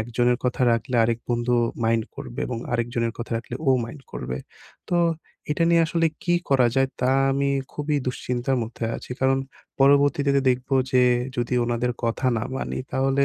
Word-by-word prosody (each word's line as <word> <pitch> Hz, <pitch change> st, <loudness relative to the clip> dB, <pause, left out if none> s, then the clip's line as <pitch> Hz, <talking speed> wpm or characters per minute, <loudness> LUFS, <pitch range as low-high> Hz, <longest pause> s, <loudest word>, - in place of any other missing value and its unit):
একজনের 120 Hz, +2 st, +1 dB
কথা 125 Hz, +1 st, 0 dB
রাখলে 115 Hz, +3 st, -2 dB
আরেক 115 Hz, 0 st, 0 dB
বন্ধু 120 Hz, +1 st, +1 dB, 0.3 s
মাইন্ড 115 Hz, -1 st, +2 dB
করবে, -, -, -7 dB
এবং 120 Hz, -2 st, -3 dB
আরেকজনের 115 Hz, -1 st, -1 dB
কথা 115 Hz, -, -5 dB
রাখলে 115 Hz, +1 st, -8 dB
ও -, -, +6 dB
মাইন্ড 135 Hz, +4 st, -10 dB
করবে। 65 Hz, +1 st, -4 dB, 0.5 s
তো 175 Hz, -, +3 dB, 0.5 s
এটা 165 Hz, +3 st, +1 dB
নিয়ে 170 Hz, 0 st, +5 dB
আসলে 165 Hz, 0 st, +1 dB, 0.2 s
কী 175 Hz, -1 st, +2 dB, 0.2 s
করা 130 Hz, -3 st, +5 dB
যায় 135 Hz, 0 st, +3 dB
তা 125 Hz, +1 st, +2 dB, 0.2 s
আমি 140 Hz, +1 st, +1 dB, 0.2 s
খুবই 150 Hz, 0 st, -1 dB
দুশ্চিন্তার 125 Hz, +1 st, -1 dB
মধ্যে 115 Hz, +1 st, -5 dB
আছি, -, -, -11 dB
কারণ 135 Hz, 0 st, +3 dB, 0.4 s
পরবর্তীতে 140 Hz, 0 st, +4 dB, 0.2 s
দেখবো 130 Hz, +2 st, -1 dB, 0.2 s
যে 125 Hz, 0 st, +5 dB, 0.3 s
যদি 120 Hz, +1 st, -1 dB
ওনাদের 120 Hz, +1 st, 0 dB
কথা 115 Hz, +3 st, -1 dB
না 110 Hz, -, -1 dB
মানি -, -, -3 dB
তাহলে 135 Hz, +1 st, +2 dB
125 Hz, 170 wpm, -24 LUFS, 120-135 Hz, 0.5 s, ও